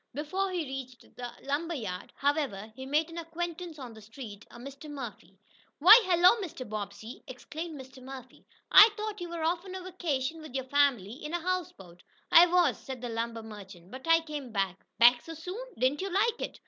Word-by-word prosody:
Before 370 +7 -1
he 350 -3 -2
reached 260 -2 -7
the 245 -1 -6
lumber 320 +5 -2
yard, 185 -9 -5
however, 270 -8 -1
he 265 +1 -8
met 305 +4 +1
an 335 - -6
acquaintance 335 0 -5
on 250 -5 -8
the 220 - -13
street, 215 -1 -10
a - - -13
Mr. 275 +4 -10
Murphy. 215 - -8 0.4
"Why, 365 +9 +10
hello, 360 +4 +6
Mr. 290 - -6
Bobbsey!" 210 +2 -6
exclaimed 300 +4 -7
Mr. 260 0 -12
Murphy. 260 -1 -11 0.3
"I 435 - +10
thought 425 -2 -4
you 350 - -5
were 335 -1 -4
off 340 +2 0
on 375 -1 -8
a 375 - -6
vacation 325 -5 -3
with 305 -4 -10
your 265 -1 -2
family 260 -5 +1
in 305 +3 -3
a - - -1
houseboat." 320 - -4 0.3
"I 345 +1 +9
was," 355 0 +3
said 265 -2 -7
the 245 0 -5
lumber 230 0 -3
merchant, 195 -4 -11
"but 260 +4 -9
I 330 0 +6
came 295 -6 -7
back." 195 -3 -2
"Back 240 +1 +7
so 330 - -9
soon? 365 +9 -6
Didn't 260 +5 +1
you 390 - -2
like 435 +5 +1
it?" - - -5
280 Hz, 200 wpm, -30 LUFS, 235-335 Hz, 0.4 s, Why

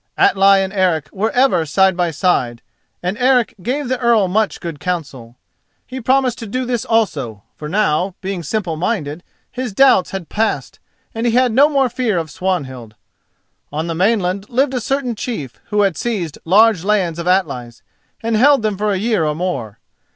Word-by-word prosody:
Atli 195 0 +5
and 190 +1 -5
Eric 175 -7 +1
were 210 +3 0
ever 250 -9 +2
side 190 +4 +2
by 175 -1 0
side, 130 -8 0 0.4
and 180 +3 -1
Eric 250 -2 +3
gave 265 +7 -2
the 255 0 -1
Earl 235 -5 +3
much 215 +4 0
good 165 -5 -6
counsel. 140 -9 -5 0.5
He 260 0 -7
promised 255 0 +1
to 225 - -7
do 255 +5 -2
this 240 -2 -2
also, 140 - -1
for 150 - -7
now, 185 -1 0
being 190 -2 -4
simple 170 +1 -2
minded, 165 -3 -2 0.3
his 255 -4 -4
doubts 260 -5 +4
had 190 -4 -6
passed 220 +1 -2 0.3
and 225 +1 -2
he 230 - +1
had 250 0 +3
no 275 +6 +5
more 275 -3 +2
fear 240 -5 -1
of 160 -2 -3
Swanhild. 130 - -4 0.8
On 155 +3 -3
the 170 - -3
mainland 195 +1 0
lived 260 +2 +1
a 250 - -1
certain 270 0 -1
chief 155 - -6
who 210 0 0
had 195 -4 +1
seized 190 -9 -3
large 205 +1 +4
lands 190 -5 0
of 170 - -4
Atli's, 125 -11 -1 0.4
and 230 0 0
held 275 +2 +4
them 210 -3 -1
for 210 0 0
a 195 - 0
year 215 -3 0
or 150 -1 0
more. 135 - -4
195 Hz, 180 wpm, -18 LUFS, 165-235 Hz, 0.8 s, Atli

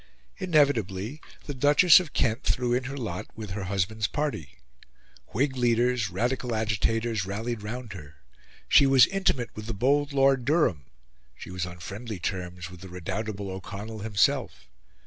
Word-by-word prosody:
Inevitably, 140 - +1 0.2
the 145 - -4
Duchess 145 +6 +6
of 175 -5 -6
Kent 115 +2 +1
threw 125 -1 0
in 125 0 0
her 135 +2 -5
lot 105 -9 -4
with 105 -4 -7
her 95 0 -4
husband's 100 +3 -1
party; 145 - -3 0.7
Whig 130 +4 0
leaders, 120 -2 +2
Radical 125 +1 -1
agitators, 110 0 0
rallied 110 +3 -3
round 110 0 -6
her; 75 -5 -11 0.5
she 140 - +6
was 135 -2 +7
intimate 190 -11 -1
with 110 0 -7
the 115 - -3
bold 145 +7 +2
Lord 135 -2 +3
Durham, 125 - +1 0.5
she - - -9
was 90 0 -3
on 90 0 -9
friendly 105 +4 -6
terms 90 0 -5
with 90 -1 -12
the 95 - -9
redoubtable 95 +3 -4
O'Connell 100 +4 -7
himself. 100 - 0
110 Hz, 150 wpm, -27 LUFS, 95-130 Hz, 0.7 s, was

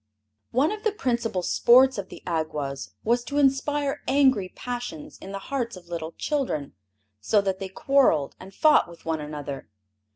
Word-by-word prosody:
One 270 +6 +2
of 425 0 -5
the 435 - +2
principal 235 - -1
sports 255 +4 +5
of 190 - -6
the - - -11
Awgwas 150 -5 -3
was 240 +2 +2
to 280 +5 -3
inspire 280 +1 +1
angry 260 -8 +3
passions 245 -10 -6
in 195 - -9
the 200 - -4 0.2
hearts 235 -6 -2
of 175 -1 -15
little 165 -1 -5
children, 250 - -2 0.5
so 205 - +2
that 195 -1 -2
they 195 -1 -5
quarreled 190 - +2
and 190 - -11
fought 305 - +4
with 170 - -15
one 160 -2 -1
another. 145 -3 -6
210 Hz, 165 wpm, -25 LUFS, 165-265 Hz, 0.5 s, sports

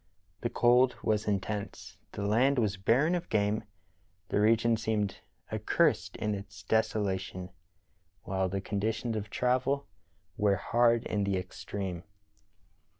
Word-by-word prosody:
The 120 - -2
cold 125 +2 +4
was 105 -1 +1
intense, 100 0 -3
the 100 - -3
land 125 +7 +3
was 105 -4 +1
barren 120 - +2
of 175 -1 -2
game, 105 0 +1 0.7
the 105 - +1
region 115 +2 +4
seemed 110 -3 -1 0.4
accursed - - +1
in 105 - -1
its 100 0 -8
desolation, 95 -4 -1 0.7
while 95 -1 -1
the 100 +1 -2
conditions 110 +4 -2
of 105 -1 -4
travel 130 +4 +1 0.5
were 105 -2 +3
hard 115 +3 +2
in 105 -1 -1
the 100 -1 0
extreme. 95 -1 -5
105 Hz, 125 wpm, -30 LUFS, 100-115 Hz, 0.7 s, cold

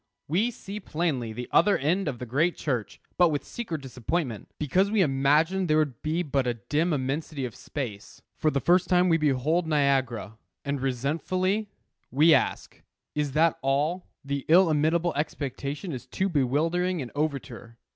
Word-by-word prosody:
we 195 +10 +1
see 210 -3 -7
plainly 155 - -2
the 120 +2 -6
other 205 - +4
end 175 +7 0
of 135 -4 -2
the 125 - -6
great 150 +9 +1
church, 125 -8 -3 0.2
but 175 -1 +6
with 145 -3 -2
secret 170 -11 -5
disappointment, 130 - -3
because 185 +7 +1
we 210 -2 +3
imagined 155 +6 +2
there 155 -1 +3
would 145 -7 0
be 160 +3 -1
but 135 -4 0
a 120 - 0
dim 150 - -1
immensity 140 0 -2
of 120 - -7
space. 115 -9 -6 0.2
For 155 - +1
the 140 - 0
first 180 +4 +3
time 180 0 +4
we 165 - +4
behold 155 +3 +1
Niagara, 130 -7 0 0.3
and 140 -1 -2
resentfully 175 - -1 0.4
we 155 +5 +5
ask, - - 0 0.3
"Is 150 -2 -1
that 160 +2 +3
all?" 145 +7 0 0.2
The 140 -1 -2
illimitable 165 0 +4
expectation 145 +3 -4
is 130 -4 -7
too 190 +1 -1
bewildering 165 +5 +1
an 120 - -9
overture. 135 -6 -4
150 Hz, 160 wpm, -27 LUFS, 135-175 Hz, 0.4 s, but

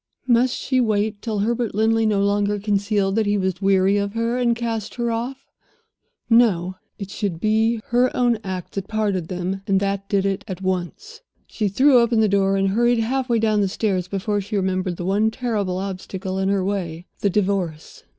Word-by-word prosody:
Must 245 0 +3
she 260 -1 0
wait 210 -2 0
till 215 -4 -2
Herbert 235 0 -1
Linley 225 +1 +2
no 200 -2 +2
longer 205 +1 +1
concealed 200 -1 0
that 220 -2 +1
he 205 0 +2
was 190 -1 -2
weary 195 0 +3
of 200 0 -2
her, 230 +2 0
and 240 -1 +2
cast 230 -2 -4
her 235 -1 -1
off? 245 +4 -4 0.8
No! 190 -6 +3 0.2
It 200 -2 -7
should 200 -6 -3
be 220 +3 +1
her 245 +1 +3
own 240 -3 +2
act 185 -2 -5
that 195 -1 -4
parted 205 -6 -1
them, 185 +2 -3
and 195 -1 +3
that 195 0 -2
did 200 -1 +1
it 195 -1 -1
at 190 -2 -5
once. 190 - -4 0.2
She 215 - -2
threw 260 +6 +5
open 235 -1 +2
the 220 - +4
door, 195 -1 +2
and 195 0 +2
hurried 240 +4 +2
half 255 +3 -1
way 235 - +3
down 215 -2 +2
the 200 - +2
stairs 185 -2 -1
before 205 +2 -1
she 205 +2 -5
remembered 185 -2 -1
the 175 - -5
one 205 +4 +2
terrible 215 -6 -2
obstacle 190 0 -4
in 190 0 0
her 195 -2 +1
way 175 -4 -3
the 200 - +1
Divorce. 185 -5 -2
205 Hz, 195 wpm, -22 LUFS, 190-225 Hz, 0.8 s, threw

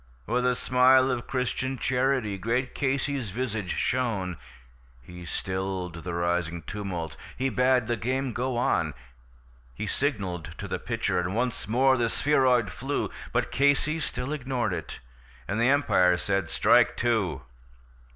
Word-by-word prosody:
With 125 +2 +1
a 125 - +2
smile 130 +1 +4
of 125 -1 -3
Christian 130 +1 -1
charity 125 -5 +1
great 115 +6 -1
Casey's 135 -3 -1
visage 110 -3 -3
shone; 105 -8 -1 0.7
He 90 +4 -10
stilled 95 -3 -3
the 85 -1 -4
rising 85 -1 -1
tumult; 90 -6 -5 0.2
he 135 +2 0
bade 125 -1 +3
the 120 +1 0
game 130 +3 -1
go 125 +1 -1
on; 120 - +1 0.8
He - - -4
signaled 100 - -2
to - - -6
the - - -3
pitcher, - - -1
and 90 +3 -2
once 120 -2 -1
more 130 +4 +4
the 120 -2 +1
spheroid 125 -6 +2
flew, - - -2 0.2
But - - 0
Casey 145 +3 +2
still 130 -1 -3
ignored 125 -7 -1
it; 80 -4 -5 0.5
and 105 +4 -1
the 120 - +4
umpire 90 -11 +4
said, 95 -2 -1
"Strike - - +4
two." 105 - 0
120 Hz, 140 wpm, -27 LUFS, 95-130 Hz, 0.8 s, smile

